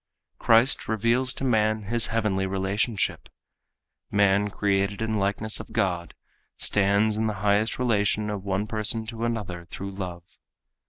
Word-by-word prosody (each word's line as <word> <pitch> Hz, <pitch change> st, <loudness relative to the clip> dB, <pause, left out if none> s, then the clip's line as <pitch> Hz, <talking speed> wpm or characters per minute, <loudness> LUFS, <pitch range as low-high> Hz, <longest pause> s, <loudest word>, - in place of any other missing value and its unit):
Christ 115 Hz, +2 st, +4 dB
reveals 115 Hz, +4 st, +2 dB
to -, -, -3 dB
man 110 Hz, -3 st, +1 dB
his 115 Hz, +3 st, +2 dB
heavenly 105 Hz, -4 st, 0 dB
relationship. 95 Hz, +3 st, -1 dB, 0.8 s
Man 100 Hz, 0 st, +3 dB
created 100 Hz, 0 st, 0 dB
in 110 Hz, 0 st, -2 dB
the 110 Hz, -, 0 dB
likeness 105 Hz, +2 st, -1 dB
of -, -, -10 dB
God 90 Hz, -3 st, -1 dB, 0.4 s
stands 105 Hz, +2 st, +2 dB
in 110 Hz, 0 st, 0 dB
the 105 Hz, -, -2 dB
highest 105 Hz, +2 st, +2 dB
relation 105 Hz, -3 st, +1 dB
of 100 Hz, -2 st, -5 dB
one 100 Hz, +1 st, -1 dB
person 110 Hz, +1 st, -2 dB
to 115 Hz, +1 st, -4 dB
another 100 Hz, -7 st, -4 dB
through 100 Hz, +3 st, -7 dB
love. 90 Hz, -3 st, -6 dB
105 Hz, 145 wpm, -25 LUFS, 100-110 Hz, 0.8 s, Christ